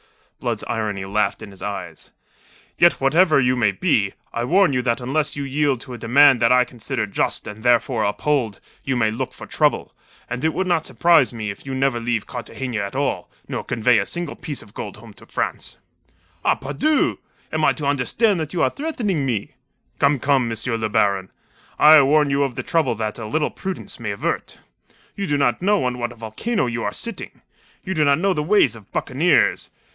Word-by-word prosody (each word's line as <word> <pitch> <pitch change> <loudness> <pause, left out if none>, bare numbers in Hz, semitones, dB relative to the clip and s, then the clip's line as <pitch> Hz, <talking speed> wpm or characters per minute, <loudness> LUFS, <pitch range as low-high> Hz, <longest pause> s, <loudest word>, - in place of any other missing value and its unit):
Blood's - - -2
irony 110 -5 -3
laughed 100 +1 -1
in 100 - -10
his 95 - -14
eyes. 100 -1 -6 0.7
"Yet, 175 0 +6
whatever 155 +3 +3
you 125 -1 +2
may 110 -5 +2
be, 105 - +1 0.2
I 120 - -2
warn 180 +4 +3
you 125 - +1
that 120 -2 0
unless 145 +5 -1
you 145 - -3
yield 140 -1 0
to 130 - -9
a 120 - -8
demand 135 +3 +5
that 115 - +4
I 125 0 +5
consider 120 -1 -4
just 100 - -1
and 105 +1 -8
therefore 120 -1 +2
uphold, 115 +1 0 0.2
you 135 - -1
may 110 -3 +2
look 125 +4 -4
for - - -9
trouble, - - 0 0.3
and 125 +2 -5
it 160 0 +1
would 190 - 0
not 175 -3 0
surprise 150 +2 +4
me 110 -3 -4
if 100 - -12
you 135 - -3
never 130 -2 +1
leave 115 -2 -1
Cartagena 125 -1 -5
at 100 +3 -4
all, 130 -10 -1 0.2
nor - - -4
convey 115 0 +2
a 100 - -1
single 175 -3 -4
gold - - -20
piece 145 -3 -4 0.3
home 110 -1 -13
to - - -16
France." - - -4 0.7
"Ah, - - +3
pardieu! 145 - 0 0.3
Am 155 0 -1
I - - +5
to 150 - -5
understand 155 - +1
that 155 0 -4
you 175 - +1
are - - +2
threatening 230 - -2
me?" 115 -7 -2 0.5
"Come, 140 +1 +3
come, 130 -2 +1
M. 115 - -4 0.2
le 110 - -1
Baron! 100 -2 +1 0.5
I 155 0 +8
warn 145 +1 +3
you 140 +1 +1
of 135 -3 -1
the - - -4
trouble 160 -8 +1
that 110 +1 -4
a 110 - -5
little 150 +8 0
prudence 190 -7 -6
may 115 -3 -4
avert. 100 - -3 0.6
You 200 -1 -3
do 145 - +1
not 125 -3 +1
know 205 -1 +2
on 125 -1 -2
what 120 0 -2
a - - -12
volcano 115 - -2
you 115 -1 -3
are 105 - -1
sitting. 230 - -7 0.4
You 190 - -2
do 155 -4 +2
not 140 -1 +4
know 190 +3 +1
the 150 - -1
ways 195 - +3
of 110 -2 -15
buccaneers. 155 +7 +1
130 Hz, 205 wpm, -21 LUFS, 115-155 Hz, 0.7 s, I